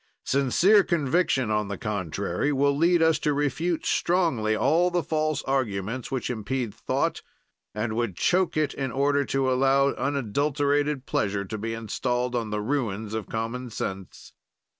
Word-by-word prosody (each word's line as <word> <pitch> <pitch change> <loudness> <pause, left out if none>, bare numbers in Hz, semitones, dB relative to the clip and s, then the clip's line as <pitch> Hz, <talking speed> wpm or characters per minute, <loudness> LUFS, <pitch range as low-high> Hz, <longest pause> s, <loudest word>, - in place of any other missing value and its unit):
"Sincere 170 - +4
conviction, 150 -7 +1
on 105 -1 0
the 100 -1 -4
contrary, 100 - -2
will 140 0 +2
lead 170 +2 +3
us 160 -1 +3
to 150 -1 +1
refute 150 +4 -1
strongly 160 -12 +1
all 165 +10 +3
the 175 -1 0
false 155 -2 -1
arguments, 120 -3 -2
which 130 -3 -2
impede 115 0 -3
thought - - -1 0.5
and 110 +1 -2
would 120 -5 -1
choke 180 -3 +1
it 155 -1 +1
in 135 -2 -3
order 140 +1 +2
to 135 -1 0
allow 135 +1 +3
unadulterated 140 +2 0
pleasure 100 -4 -1
to 110 +3 -5
be 115 +2 -3
installed 125 +2 -2
on 115 -3 -2
the 105 0 -2
ruins 110 -4 -2
of 110 -1 -4
common 115 +3 -3
sense. 95 -4 -6
130 Hz, 150 wpm, -26 LUFS, 110-145 Hz, 0.5 s, Sincere